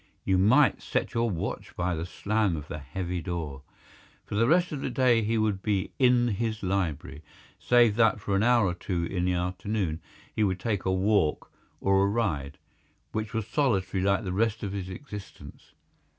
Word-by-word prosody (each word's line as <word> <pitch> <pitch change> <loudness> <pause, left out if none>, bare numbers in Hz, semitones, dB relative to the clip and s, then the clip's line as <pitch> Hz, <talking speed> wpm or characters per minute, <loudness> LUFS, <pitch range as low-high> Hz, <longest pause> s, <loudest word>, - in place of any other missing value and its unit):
You 95 -1 +2
might 125 +8 +4
set - - -2
your 115 0 +1
watch 85 -5 -4
by 90 0 -1
the 85 +1 -4
slam 105 0 0
of 75 0 -7
the 75 - -6
heavy 85 +5 -4
door. 80 -5 -4 0.6
For - - -8
the 115 +3 +3
rest 175 +4 +3
of 145 -3 -4
the - - -2
day 120 -2 +3
he 110 +1 0
would 105 -3 0
be 100 -2 -1
in 125 -2 +4
his 110 +1 -2
library—save 95 - 0
that 115 -2 +4
for 100 -1 -2
an 100 - +2
hour 120 -1 +4
or 90 - 0
two 90 -1 -3
in 90 +1 -2
the 90 - +1
afternoon 90 -1 -2 0.3
he 110 - +2
would 95 -2 0
take 105 -4 -2
a 95 - +2
walk 95 -4 +1 0.3
or 95 0 +3
a 100 - +3
ride, 80 -11 -1 0.5
which 110 0 -3
was 110 -2 -1
solitary 100 -8 0
like 100 +3 +2
the 90 -2 -3
rest 110 +3 0
of 100 - -3
his 95 -2 -4
existence. 105 0 -10
100 Hz, 185 wpm, -27 LUFS, 90-110 Hz, 0.6 s, might